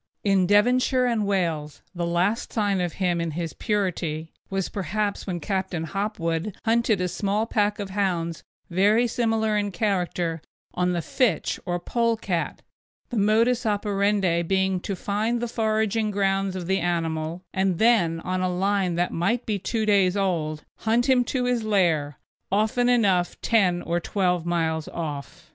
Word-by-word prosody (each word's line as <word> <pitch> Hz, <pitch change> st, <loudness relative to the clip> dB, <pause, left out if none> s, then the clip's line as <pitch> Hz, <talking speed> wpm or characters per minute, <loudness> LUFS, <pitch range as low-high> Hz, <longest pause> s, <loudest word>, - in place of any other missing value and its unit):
In 195 Hz, -3 st, +3 dB
Devonshire 250 Hz, +5 st, +3 dB
and 225 Hz, -4 st, 0 dB
Wales 165 Hz, -7 st, -1 dB
the 170 Hz, -2 st, -2 dB
last 180 Hz, +7 st, 0 dB
sign 205 Hz, -4 st, +1 dB
of 175 Hz, -2 st, -2 dB
him 175 Hz, -3 st, 0 dB
in 170 Hz, -, -1 dB
his 165 Hz, +1 st, -4 dB
purity 170 Hz, -6 st, -2 dB, 0.2 s
was 195 Hz, -1 st, -1 dB
perhaps 205 Hz, +3 st, -2 dB
when 180 Hz, -2 st, -2 dB
Captain 185 Hz, -4 st, -2 dB
Hopwood 185 Hz, 0 st, -2 dB
hunted 230 Hz, -2 st, +2 dB
a 180 Hz, -, 0 dB
small 200 Hz, +4 st, -1 dB
pack 210 Hz, -2 st, +1 dB
of 200 Hz, -2 st, -5 dB
hounds 175 Hz, -5 st, -1 dB, 0.3 s
very 205 Hz, +7 st, +3 dB
similar 225 Hz, -2 st, 0 dB
in 205 Hz, -1 st, 0 dB
character 180 Hz, -5 st, -1 dB, 0.3 s
on 180 Hz, 0 st, 0 dB
the 170 Hz, -2 st, -2 dB
fitch 250 Hz, -5 st, 0 dB
or 175 Hz, 0 st, -1 dB
pole 230 Hz, +4 st, 0 dB
cat; 175 Hz, -6 st, -3 dB, 0.5 s
the 240 Hz, -, -2 dB
modus 225 Hz, +4 st, +3 dB
operandi 200 Hz, -4 st, +1 dB
being 190 Hz, +1 st, +1 dB
to 195 Hz, +2 st, -4 dB
find 215 Hz, +6 st, -1 dB
the 240 Hz, -, -2 dB
foraging 220 Hz, -1 st, 0 dB
grounds 195 Hz, -1 st, 0 dB
of 180 Hz, -2 st, -4 dB
the 190 Hz, +2 st, +1 dB
animal, 165 Hz, -1 st, -2 dB
and 190 Hz, -2 st, +1 dB
then 175 Hz, -8 st, +3 dB
on 185 Hz, +1 st, -2 dB
a 185 Hz, -, +1 dB
line 190 Hz, 0 st, 0 dB
that 175 Hz, +1 st, 0 dB
might 225 Hz, +9 st, 0 dB
be 210 Hz, -2 st, -1 dB
two 220 Hz, +3 st, -1 dB
days 200 Hz, -2 st, +3 dB
old 160 Hz, -6 st, -1 dB
hunt 230 Hz, +2 st, +1 dB
him 255 Hz, -2 st, +4 dB
to 255 Hz, 0 st, -1 dB
his 245 Hz, -1 st, +1 dB
lair, 170 Hz, -9 st, +1 dB, 0.3 s
often 220 Hz, +5 st, +2 dB
enough 195 Hz, -8 st, +2 dB
ten 185 Hz, -6 st, +2 dB
or 170 Hz, +1 st, 0 dB
twelve 180 Hz, -2 st, 0 dB
miles 160 Hz, -2 st, 0 dB
off. 160 Hz, +1 st, -6 dB
195 Hz, 160 wpm, -25 LUFS, 175-215 Hz, 0.5 s, him